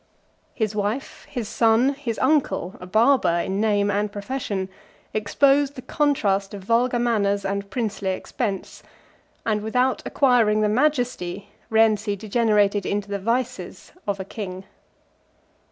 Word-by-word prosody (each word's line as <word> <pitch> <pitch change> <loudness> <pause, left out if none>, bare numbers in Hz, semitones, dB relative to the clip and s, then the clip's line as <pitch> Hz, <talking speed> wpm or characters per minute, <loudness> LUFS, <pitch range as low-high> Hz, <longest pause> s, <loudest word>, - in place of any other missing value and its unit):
His 220 -3 -1
wife, 210 +6 -3
his 235 -4 -4
son, 230 +3 +3
his 255 -5 -4
uncle, 260 - +1
(a 180 - -9
barber 220 -2 +3
in 195 +2 -1
name 205 -2 +2
and 205 +1 0
profession,) 205 -2 -3 0.5
exposed 275 +6 +2
the 255 - -8
contrast 205 -10 0
of 195 - -9
vulgar 240 +4 +2
manners 205 -4 +1
and 200 0 -2
princely 210 -3 -2
expense; 195 +2 -4 0.6
and 215 -2 +1
without 250 +4 +1
acquiring 235 -6 +3
the 210 - +2
majesty, 245 -7 0 0.2
Rienzi 220 -2 +3
degenerated 210 -1 +2
into 205 +2 -2
the 200 0 -2
vices, 245 +5 -3 0.2
of 200 -1 -1
a 190 - -4
king. 190 -2 -6
215 Hz, 130 wpm, -23 LUFS, 200-245 Hz, 0.6 s, son